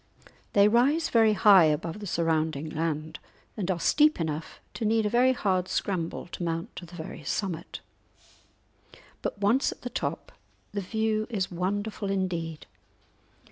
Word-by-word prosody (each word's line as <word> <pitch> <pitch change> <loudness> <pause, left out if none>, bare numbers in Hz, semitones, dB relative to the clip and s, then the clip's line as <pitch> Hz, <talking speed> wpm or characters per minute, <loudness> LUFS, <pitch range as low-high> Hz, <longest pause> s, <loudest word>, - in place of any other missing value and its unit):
They 200 0 +6
rise 265 +9 +3
very 225 -2 +4
high 195 -3 +7
above 160 +5 -1
the 205 - -6
surrounding 160 -3 0
land, 155 0 -3 0.4
and 195 -4 -3
are 180 -2 0
steep 300 - +4
enough 160 -1 -4
to - - -5
need 220 0 +2
a 210 - 0
very 250 +2 +4
hard 185 -6 0
scramble 175 -5 -2
to - - -7
mount 165 -1 -3
to 175 - -7
the 175 - -12
very 160 -1 -8
summit; 170 +2 -3 1.4
but - - -3
once 210 +7 +2
at - - -12
the 245 - -5
top - - -3 0.4
the 200 - -3
view 220 +2 -1
is 195 -6 -2
wonderful 200 +3 -2
indeed. 170 -5 -2
190 Hz, 150 wpm, -27 LUFS, 165-215 Hz, 1.4 s, high